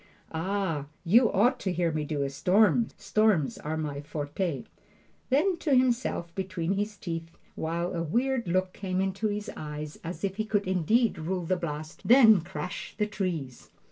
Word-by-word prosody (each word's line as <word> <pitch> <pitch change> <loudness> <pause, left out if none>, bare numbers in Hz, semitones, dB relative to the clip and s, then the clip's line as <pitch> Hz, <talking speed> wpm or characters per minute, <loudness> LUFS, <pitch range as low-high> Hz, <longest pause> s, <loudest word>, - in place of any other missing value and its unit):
"Ah, 165 -3 -1 0.2
you 225 +7 +5
ought 240 +6 +3
to 190 - -1
hear 175 -2 +1
me 155 -1 -1
do 145 -1 -2
a 140 - -1
storm! 210 - +3
Storms 215 -10 +2
are 155 +1 -3
my 145 -2 -3
forte!" 145 0 -3 0.7
Then 335 +8 +3
to 300 -5 +2
himself 245 -9 +1
between 185 -2 -2
his 205 +1 -2
teeth, 165 -2 -5 0.2
while 170 +3 -2
a 170 - -2
weird 240 - 0
look 185 +1 0
came 185 -2 -3
into 195 +3 0
his 210 0 -3
eyes 150 0 -6
as 175 +4 -6
if 195 0 -1
he 215 - -1
could 210 -2 0
indeed 190 +4 +2
rule 175 +2 -2
the 185 - +1
blast, 155 -2 -5
"Then 225 -6 +8
crash 175 +2 -6
the 210 - +2
trees!" 175 -11 -4
185 Hz, 170 wpm, -28 LUFS, 160-210 Hz, 0.7 s, Then